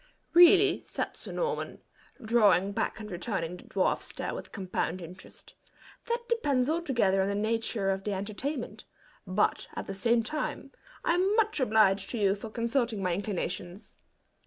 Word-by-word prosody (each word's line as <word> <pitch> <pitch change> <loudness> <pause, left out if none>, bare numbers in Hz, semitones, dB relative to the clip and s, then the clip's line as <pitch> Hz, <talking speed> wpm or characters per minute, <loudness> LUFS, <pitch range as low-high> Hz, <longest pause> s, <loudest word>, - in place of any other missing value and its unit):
"Really," 355 +3 +7
said - - -4
Sir - - -7
Norman, 475 -1 -3 0.4
drawing 205 -4 +3
back 200 - -2
and 210 -1 -8
returning 180 -2 -3
the - - -15
dwarf's 190 -2 0
stare - - -4
with - - -7
compound 185 -2 -2
interest, 180 +2 -11 0.5
"that 475 0 -2
depends 290 - +1
altogether 240 - +1
on 190 - +1
the 200 - -1
nature 215 -1 0
of 195 0 -3
the 205 - -2
entertainment; 220 +8 -4 0.4
but, 185 +3 +1
at - - -4
the 195 - -5
same 230 +4 +2
time, 305 +6 -4 0.3
I'm 370 +4 +2
much 435 -5 +2
obliged 215 -5 +3
to 240 - -3
you 200 -3 +3
for 210 +2 -7
consulting 230 -2 -1
my 180 -1 +1
inclinations." 190 0 -4
215 Hz, 155 wpm, -29 LUFS, 195-270 Hz, 0.5 s, Really